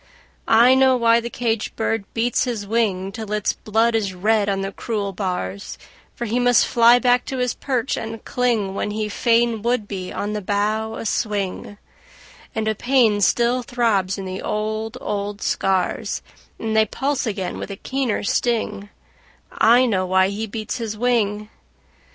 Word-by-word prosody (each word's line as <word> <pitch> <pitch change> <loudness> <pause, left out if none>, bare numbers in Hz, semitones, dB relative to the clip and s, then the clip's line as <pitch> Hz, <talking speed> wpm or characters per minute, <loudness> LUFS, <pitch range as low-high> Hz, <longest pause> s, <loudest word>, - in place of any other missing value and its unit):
I 235 +3 +6
know 260 -1 +4
why 230 -1 +4
the 235 0 -5
caged 230 -3 -2
bird 225 -2 -2
beats 240 +3 +1
his 230 -5 -3
wing 200 -3 0
Till 220 0 -7
its 210 -1 0
blood 225 +2 +1
is 200 -4 -1
red 210 +2 +2
on 195 -1 0
the 195 0 -3
cruel 205 -2 -3
bars; 180 - -4 0.4
For 240 - -4
he 235 +2 0
must 245 -2 +4
fly 235 +1 +5
back 245 0 +3
to 265 - -4
his 250 -2 0
perch 255 -2 -2
and 225 0 -6
cling 230 -6 0
When 200 - -2
he 210 0 -2
fain 230 +1 +2
would 235 -2 0
be 185 -3 -5
on 205 +1 -3
the 210 - -3
bough 215 +3 -1
a - - -6
swing; 205 -2 -2 0.8
And 220 -1 -1
a 220 - +2
pain 230 -3 +2
still 240 +4 +2
throbs 225 -7 0
in 195 - -5
the 185 0 -5
old, 215 +2 -3
old 205 0 -3
scars 195 +3 -1 0.3
And 220 -1 -3
they 220 0 +4
pulse 270 +3 -1
again 195 -4 -3
with - - -6
a 200 - -5
keener 260 +1 -2
sting 220 -2 -1 0.6
I 240 +3 +5
know 190 -6 0
why 190 +1 +3
he 215 +3 -4
beats 215 +3 -4
his 220 -2 -4
wing! 215 -3 0
220 Hz, 170 wpm, -21 LUFS, 200-235 Hz, 0.8 s, I